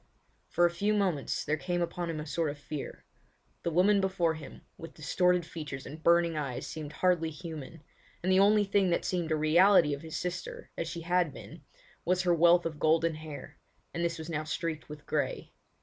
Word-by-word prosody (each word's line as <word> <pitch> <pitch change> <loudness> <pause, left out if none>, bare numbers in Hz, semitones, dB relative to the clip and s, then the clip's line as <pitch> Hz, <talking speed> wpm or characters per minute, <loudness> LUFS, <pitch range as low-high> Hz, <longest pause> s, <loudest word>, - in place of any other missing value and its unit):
For 175 - +3
a 170 - +3
few 205 +5 0
moments 185 -9 0
there 150 +1 0
came 175 +2 -2
upon 175 0 -2
him 160 -2 -3
a 150 - -5
sort 160 0 -1
of 145 - -6
fear. 145 0 -7 0.6
The - - -1
woman 195 +5 +4
before 185 -4 +1
him, 155 -3 -10
with 165 - -10
distorted 180 +2 +1
features 150 -5 -7
and 155 +3 -9
burning 170 0 +4
eyes 135 -5 -3
seemed 150 -1 -6
hardly 175 -2 +2
human, 160 -1 -8 0.4
and 185 - +1
the 185 - +5
only 205 +1 +5
thing 200 -1 +2
that 170 - 0
seemed 175 -3 -1
a - - +3
reality 160 +1 +5
of 140 - -5
his 160 -1 -6
sister, 180 0 -5
as 165 - -3
she 170 0 -5
had 175 -1 +1
been, - - -11 0.4
was 180 +1 +1
her 175 -1 +3
wealth 170 +1 +5
of 155 -2 -4
golden 165 +1 +3
hair, 155 -2 -9 0.3
and 170 - -2
this 170 0 -1
was 160 -1 -7
now 155 -2 -2
streaked 155 0 -4
with 150 -1 -10
grey. - - -2
165 Hz, 200 wpm, -30 LUFS, 155-180 Hz, 0.6 s, the